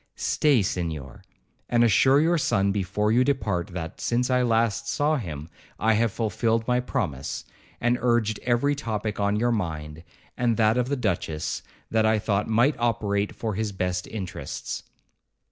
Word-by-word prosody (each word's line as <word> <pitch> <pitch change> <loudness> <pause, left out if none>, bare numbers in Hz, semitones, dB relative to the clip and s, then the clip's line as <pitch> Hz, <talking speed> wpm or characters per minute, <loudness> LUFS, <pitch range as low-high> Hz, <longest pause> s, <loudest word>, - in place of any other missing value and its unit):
'Stay, 140 -8 +2
Senhor, 80 -8 -4 0.5
and 120 -1 +4
assure 130 +5 +5
your 165 +3 +3
son 100 -7 +2
before 105 +2 0
you 120 +3 +4
depart, 105 -11 0
that, 85 -3 -6
since 125 +2 0
I 125 0 +3
last 115 -3 +1
saw 150 +2 +1
him, 80 - -6 0.3
I 110 +1 +3
have 115 0 +2
fulfilled 115 +1 0
my 125 0 +2
promise, 70 - -3 0.3
and 120 +1 +1
urged 120 -3 +1
every 125 +4 +2
topic 110 -7 -3
on 100 0 +1
your 120 +1 +2
mind, 80 -7 -3 0.3
and 120 -3 +1
that 110 -1 +4
of 125 +1 0
the 140 - +1
duchess, 85 - -2 0.3
that 110 -1 +3
I 110 0 +3
thought 105 -1 0
might 120 +7 +3
operate 105 -3 0
for 110 -2 -3
his 105 +1 -2
best 90 -1 -2
interests.' 95 -6 -5
110 Hz, 160 wpm, -25 LUFS, 95-120 Hz, 0.5 s, assure